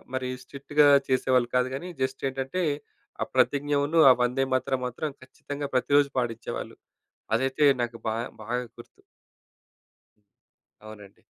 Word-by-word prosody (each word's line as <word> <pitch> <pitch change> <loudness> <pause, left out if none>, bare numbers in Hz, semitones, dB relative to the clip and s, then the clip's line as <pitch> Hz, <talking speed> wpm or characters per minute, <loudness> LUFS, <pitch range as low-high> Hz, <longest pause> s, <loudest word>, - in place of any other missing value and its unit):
మరి 130 -1 -2
స్ట్రిక్ట్‌గా 140 +3 +2 0.2
చేసేవాళ్ళు 130 -1 +2
కాదు. 125 0 +3
కానీ 175 +7 -6
జస్ట్ 130 0 -2
ఏంటంటే 135 +7 -3 0.6
ఆ - - -4
ప్రతిజ్ఞను 145 +2 +2
ఆ - - +8
వందేమాతరం 130 +1 0
మాత్రం 125 +5 -4
ఖచ్చితంగా 140 +2 -7
ప్రతిరోజూ 140 +2 +3
పాడించేవాళ్ళు. 115 -2 -4 0.6
అదైతే 135 +4 +1 0.2
నాకు 120 -1 -3
బాగా, 115 +2 -1 0.2
బాగా 115 +3 -2 0.2
గుర్తు. 120 - -15 1.9
అవునండి. 105 -2 -13
130 Hz, 110 wpm, -26 LUFS, 120-140 Hz, 1.9 s, ఆ